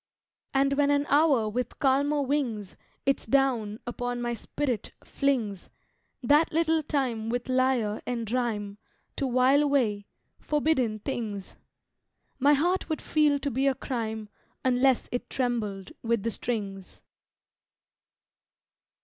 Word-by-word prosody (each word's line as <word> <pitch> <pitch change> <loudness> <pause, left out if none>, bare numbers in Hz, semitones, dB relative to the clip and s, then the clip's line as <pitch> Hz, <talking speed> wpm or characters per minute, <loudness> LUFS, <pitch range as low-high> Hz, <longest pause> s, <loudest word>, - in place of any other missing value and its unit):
And 275 0 +2
when 285 0 +2
an 285 0 +2
hour 285 -6 +4
with 245 +4 -3
calmer 285 +2 +2
wings 250 -8 -2 0.3
Its 275 -4 +1
down 235 -5 +1
upon 245 0 -3
my 240 0 -1
spirit 250 0 -3
flings 235 -9 -1 0.5
That 295 +6 +4
little 320 0 +2
time 255 -7 -1
with 245 +1 -2
lyre 255 -5 +1
and 230 -3 -3
rhyme 210 -5 -2 0.4
To 275 - 0
while 255 +3 +4
away 240 -9 +1 0.3
forbidden 295 -7 +1
things! 215 -4 -5 0.8
My 285 +2 +5
heart 350 +7 +1
would 315 - -1
feel 300 -2 +2
to 285 - -1
be 265 +4 +1
a 270 - +2
crime 220 -5 -4 0.4
Unless 255 0 +3
it 245 - -3
trembled 215 -7 -2
with 230 -3 0
the 230 - 0
strings. 200 -5 -4
250 Hz, 125 wpm, -27 LUFS, 220-280 Hz, 0.8 s, My